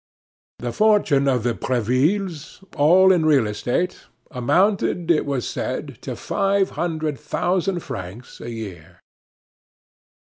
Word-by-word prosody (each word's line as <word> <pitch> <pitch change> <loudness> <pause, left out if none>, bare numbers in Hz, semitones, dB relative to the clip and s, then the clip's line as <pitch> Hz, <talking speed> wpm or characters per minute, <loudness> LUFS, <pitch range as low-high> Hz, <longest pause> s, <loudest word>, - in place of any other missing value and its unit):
The 120 0 -4
fortune 200 - +3
of 125 -4 +1
the 120 0 +1
Brevilles, 150 - -1
all 180 +6 +5
in 175 -3 +3
real 145 -6 +4
estate, 120 +12 -2 0.3
amounted, 175 - +1
it 155 - +1
was 135 -4 -2
said, - - -4
to - - -5
five 195 0 0
hundred 155 -4 -3
thousand 180 0 -1
francs 100 +4 -8
a 120 - -6
year. 90 -7 -9
150 Hz, 115 wpm, -22 LUFS, 120-180 Hz, 0.3 s, all